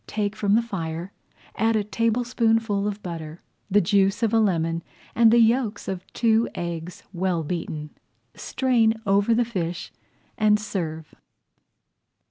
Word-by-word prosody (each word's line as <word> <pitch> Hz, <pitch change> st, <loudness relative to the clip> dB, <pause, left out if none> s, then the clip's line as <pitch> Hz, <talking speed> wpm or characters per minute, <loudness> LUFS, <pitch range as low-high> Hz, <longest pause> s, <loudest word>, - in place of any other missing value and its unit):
Take 210 Hz, -1 st, -2 dB
from 205 Hz, 0 st, +2 dB
the 230 Hz, -, +3 dB
fire, 170 Hz, -4 st, -5 dB, 0.4 s
add 225 Hz, +2 st, +1 dB
a 215 Hz, -, +1 dB
tablespoonful 225 Hz, -1 st, +1 dB
of 205 Hz, 0 st, -4 dB
butter, 165 Hz, -2 st, -6 dB, 0.3 s
the 205 Hz, +1 st, +4 dB
juice 195 Hz, +3 st, +2 dB
of 225 Hz, -1 st, +1 dB
a 225 Hz, -, +5 dB
lemon, 165 Hz, -5 st, +1 dB, 0.3 s
and 230 Hz, 0 st, +5 dB
the 235 Hz, -, +5 dB
yolks 230 Hz, -2 st, +2 dB
of 185 Hz, -1 st, -5 dB
two 225 Hz, -1 st, +2 dB
eggs 170 Hz, 0 st, -5 dB
well 180 Hz, -2 st, 0 dB
beaten. 155 Hz, -2 st, -4 dB, 0.4 s
Strain 235 Hz, -4 st, +1 dB
over 200 Hz, +3 st, +3 dB
the 240 Hz, +1 st, +2 dB
fish 180 Hz, -6 st, -4 dB, 0.5 s
and 210 Hz, -1 st, +4 dB
serve. 160 Hz, -7 st, -5 dB
205 Hz, 135 wpm, -24 LUFS, 175-225 Hz, 0.5 s, a